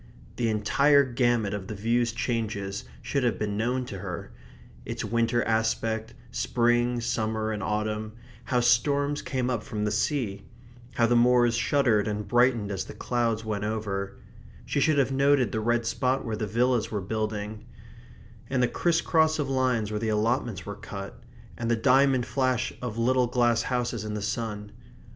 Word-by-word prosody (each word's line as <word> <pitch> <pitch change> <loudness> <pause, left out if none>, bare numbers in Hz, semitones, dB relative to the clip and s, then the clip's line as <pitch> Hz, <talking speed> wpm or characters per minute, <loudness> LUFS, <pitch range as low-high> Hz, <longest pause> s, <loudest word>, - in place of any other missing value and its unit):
The 120 -2 +1
entire 140 +7 +4
gamut 120 -5 +1
of 100 -2 -5
the 110 - -5
view's 115 +3 +1
changes 105 - -3 0.2
should 140 - -1
have 120 - +1
been 105 -1 -2
known 125 +4 -1
to 100 -6 -7
her; - - -6 0.5
its - - -4
winter 115 0 +1
aspect, 110 0 -1 0.2
spring, 120 0 +1
summer 110 -2 -1
and 105 -1 -3
autumn; 105 +1 -2 0.3
how 125 -2 +1
storms 140 +4 +2
came 130 -2 -2
up 120 -4 -1
from 105 -3 -3
the 105 - 0
sea; 120 -10 -1 0.5
how 115 - +3
the 120 +1 +2
moors 120 0 +4
shuddered 120 -3 +2
and 105 0 -3
brightened 120 -4 +2
as 95 -1 -3
the - - -10
clouds 115 -3 -1
went 105 -2 -2
over; 100 -2 -3 0.5
she - - -1
should 155 0 +3
have 135 -2 +2
noted 135 -4 +3
the 110 - -1
red 120 +1 +1
spot 130 +3 0
where 115 -2 -2
the 110 0 -3
villas 120 +2 +1
were 105 - -2
building; 105 +1 -4 0.8
and 130 -1 +1
the - - +4
criss 170 +4 +1
cross 160 -1 +3
of 145 -3 -2
lines 125 -5 +1
where 105 - -2
the 110 0 -1
allotments 110 -2 0
were 100 - -5
cut; 100 -1 -8 0.4
and 115 -1 -2
the 120 - +3
diamond 130 +2 +3
flash 130 -2 0
of 120 -3 -4
little 125 +1 +2
glass 120 -2 +2
houses 120 -2 -2
in 105 0 -4
the 105 - -3
sun. 105 -2 -3
115 Hz, 170 wpm, -27 LUFS, 105-125 Hz, 0.8 s, entire